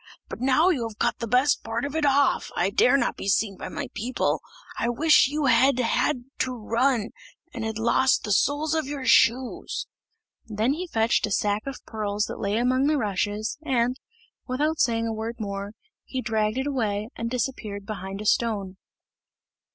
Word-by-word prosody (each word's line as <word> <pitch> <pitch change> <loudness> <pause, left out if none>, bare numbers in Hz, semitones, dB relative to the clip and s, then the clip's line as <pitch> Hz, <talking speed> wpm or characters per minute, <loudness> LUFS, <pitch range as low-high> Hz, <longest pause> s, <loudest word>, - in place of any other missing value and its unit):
But - - -7
now 270 +7 +4
you 305 -10 +1
have 215 -2 -11
cut 240 - 0
the 235 - -3
best 255 +5 +2
part 230 +3 -2
of 285 +1 -5
it 310 -2 +2
off, 280 0 +2
I 185 +3 +1
dare 250 +6 +4
not - - 0
be - - -6
seen 200 0 +1
by - - -7
my 285 -2 -5
people. 245 +5 -1 0.3
I 235 - -1
wish 295 +4 +5
you 295 +1 -1
had 265 0 +4
had 250 +2 +1 0.2
to 255 -1 -1
run, 230 0 0 0.4
and 230 - -5
had 220 -1 -3
lost 250 +3 +2
the 210 - -3
soles 290 +9 +2
of 315 -4 0
your 280 -2 -5
shoes!" 245 +1 +2 0.6
Then 220 +4 0
he 360 +4 -4
fetched 225 -6 +1
a - - -7
sack 205 +3 0
of 275 - -7
pearls 210 -2 -2
that - - -7
lay 200 +1 0
among 255 +3 +2
the 305 0 +2
rushes, 210 +1 -2
and, 250 -3 +1 0.5
without 300 +5 0
saying 230 -1 +2
a 225 - -2
word 220 +2 -4
more, 200 -1 -5 0.3
he 260 - -5
dragged 220 -2 0
it 265 - -1
away 220 -6 -1
and 230 0 -3
disappeared 225 -5 -3
behind 195 -2 -6
a - - -7
stone. 205 -4 0
235 Hz, 185 wpm, -25 LUFS, 215-270 Hz, 0.6 s, wish